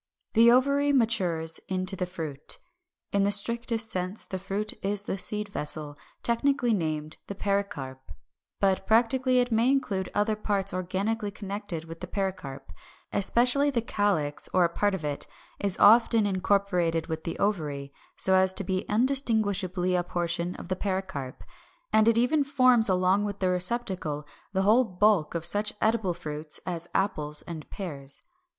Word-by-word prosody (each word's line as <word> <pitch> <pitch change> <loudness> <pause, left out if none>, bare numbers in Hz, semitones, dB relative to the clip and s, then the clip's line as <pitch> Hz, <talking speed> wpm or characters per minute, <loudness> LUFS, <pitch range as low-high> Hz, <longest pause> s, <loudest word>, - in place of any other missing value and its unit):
= - - -52
The 230 +1 +6
ovary 280 +3 +3
matures 180 - +1
into 185 +1 -1
the 180 -1 -3
Fruit. 160 -6 -4 0.5
In 200 - +1
the 200 - +2
strictest 230 +2 0
sense 185 +3 -3
the 190 - -5
fruit 195 +3 -4
is 200 +1 0
the 205 - -3
seed 210 +2 -2
vessel, 150 -4 -2 0.3
technically 245 0 +1
named 155 -4 -3
the 200 - -6
PERICARP. 195 -11 -2 0.6
But 195 -1 +1
practically 250 +3 +3
it 245 -1 +2
may 230 +3 +3
include 200 -9 0
other 210 +1 +1
parts 200 -2 -2
organically 200 +4 -2
connected 200 -4 -6
with 165 0 -10
the 180 - -6
pericarp. 185 - -5 0.4
Especially 245 +8 +3
the 240 -5 -1
calyx, 195 -10 -1
or 185 - +5
a - - +1
part 205 +3 0
of 165 -5 -6
it, 145 -1 -3 0.3
is 200 -2 0
often 225 +1 +5
incorporated 185 -4 0
with 160 0 -5
the 165 - -4
ovary, 150 -9 -2 0.2
so 190 - +2
as 190 0 +4
to 195 - +2
be 185 +1 -3
undistinguishably 210 -7 +1
a 180 - +2
portion 175 0 -2
of - - -9
the 185 - 0
pericarp, 185 -10 -4 0.5
and 220 0 +5
it 230 0 +5
even 280 +5 +3
forms 255 -5 +3
along 185 +2 +2
with 205 -1 -4
the 185 - +1
receptacle 180 -6 -1 0.3
the 190 0 0
whole 220 +6 +5
bulk 195 -5 +1
of 170 0 0
such 205 +4 +7
edible 215 -5 +1
fruits 150 -2 -4
as 170 -1 -4
apples 150 -6 +2
and 160 -3 -8
pears. 140 -8 -6
195 Hz, 160 wpm, -27 LUFS, 175-220 Hz, 0.6 s, such